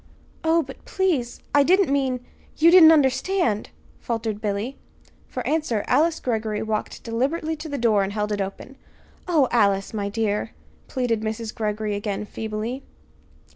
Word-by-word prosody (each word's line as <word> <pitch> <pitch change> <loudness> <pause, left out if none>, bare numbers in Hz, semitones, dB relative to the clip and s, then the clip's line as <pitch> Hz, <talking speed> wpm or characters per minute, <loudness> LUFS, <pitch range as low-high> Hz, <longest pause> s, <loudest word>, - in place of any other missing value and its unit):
"Oh, 325 +1 +3
but, - - -12
please, 335 -11 -1
I 290 - +6
didn't 360 0 +3
mean 260 -3 0 0.3
you 330 +2 +6
didn't 340 -3 +9
understand," 270 - +2 0.3
faltered 225 -3 -3
Billy. 210 +5 -2 0.5
For - - -5
answer 300 -9 0
Alice 310 +5 +2
Greggory 220 -3 -2
walked 220 -1 -3
deliberately 280 +8 -1
to 315 +1 -7
the 285 - -3
door 225 -4 +3
and 195 0 -1
held 210 0 -2
it 205 -1 -1
open. 195 +7 -6 0.5
"Oh, 310 -7 +3
Alice, 200 -3 +2
my 200 -2 -2
dear," 210 -1 -1 0.3
pleaded 245 -4 -1
Mrs. 220 +1 -4
Greggory 215 -1 -2
again, 205 0 -3
feebly. 220 +5 -4
230 Hz, 145 wpm, -24 LUFS, 210-290 Hz, 0.5 s, didn't